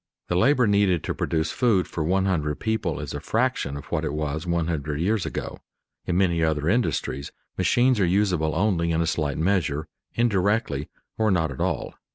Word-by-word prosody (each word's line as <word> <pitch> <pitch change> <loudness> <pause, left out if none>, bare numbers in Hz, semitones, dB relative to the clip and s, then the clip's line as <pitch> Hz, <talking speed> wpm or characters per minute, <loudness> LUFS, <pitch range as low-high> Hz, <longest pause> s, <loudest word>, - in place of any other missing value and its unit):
The 90 - 0
labor 125 +7 +4
needed 100 -5 +2
to - - -2
produce 80 -1 -1
food 110 -8 +2
for 80 - -3
one 95 +4 +1
hundred 75 -6 -1
people 110 -1 -1
is - - -5
a - - -3
fraction 115 - -1
of 70 - -9
what 80 - 0
it 75 -2 -2
was 75 +2 -3
one 85 -1 +1
hundred 75 -3 -2
years 100 +3 0
ago. - - -5 0.5
In 90 - +1
many 85 -4 +2
other 80 -1 0
industries 85 - 0 0.2
machines 125 -1 +3
are 95 - +4
usable 90 -5 +1
only 85 -3 +1
in 80 0 +1
a - - +1
slight 75 -4 -1
measure, 80 -4 0 0.3
indirectly, 100 - +1 0.3
or 110 -1 +3
not 80 -6 +1
at 65 - -8
all. - - -1
85 Hz, 190 wpm, -25 LUFS, 80-105 Hz, 0.5 s, labor